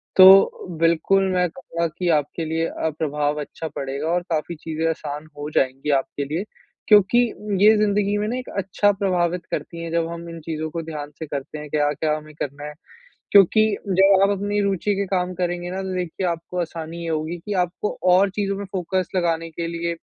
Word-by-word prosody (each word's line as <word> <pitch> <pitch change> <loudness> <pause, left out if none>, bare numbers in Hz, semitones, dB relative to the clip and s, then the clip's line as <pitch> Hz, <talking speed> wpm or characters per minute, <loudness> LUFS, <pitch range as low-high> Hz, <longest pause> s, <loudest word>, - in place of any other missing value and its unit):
तो 190 -2 +7
बिल्कुल 170 +4 +3
मैं 180 -1 +2
कहूँगा 170 -1 -3
कि 180 -1 0
आपके 150 +3 -5
लिए 160 +1 -1
अ, 160 - -2
प्रभाव 150 -1 -1
अच्छा 160 +2 -6
पड़ेगा 140 +2 -3
और 175 +1 +1
काफ़ी 160 +2 -1
चीज़ें 160 +1 -3
आसान 150 -1 -5
हो 145 +1 -5
जाएँगी 135 +2 0
आपके 140 +1 -5
लिए। 155 +7 -2 0.4
क्योंकि 210 +1 +6 0.5
ये 215 +1 +8
ज़िंदगी 205 -1 +1
में 210 +1 -1
ना 235 - -2
एक 255 - -6
अच्छा 195 +1 +2
प्रभावित 180 -3 0
करती 170 -1 -4
हैं 165 - -5
जब 165 0 +1
हम 170 0 -7
इन 165 0 -8
चीज़ों 155 0 -4
को 170 - -3
ध्यान 150 -2 -6
से 160 - -4
करते 145 +1 -5
हैं 150 0 -8
क्या-क्या 150 +1 0
हमें 155 0 -12
करना 145 +1 -5
है। 150 - -6 0.6
क्योंकि 200 +2 +6 0.3
जब 195 +1 +5
आप 200 - +4
अपनी 205 +1 -1
रूचि 200 +1 0
के 200 +1 -1
काम 185 -1 -1
करेंगे 175 0 -2
ना 190 +1 -3
तो 190 -1 -4
देखिए 180 +1 -3
आपको 170 +1 -3
आसानी 165 0 -6
ये 165 - -3
होगी 160 +2 -2
कि 210 - -3
आपको 180 +4 -4 0.2
और 195 +2 +5
चीज़ों 200 -1 -1
में 200 - -5
फ़ोकस 185 0 -1
लगाने 165 -2 0
के 165 +1 -4
लिए 170 0 -2
170 Hz, 195 wpm, -22 LUFS, 155-190 Hz, 0.6 s, ये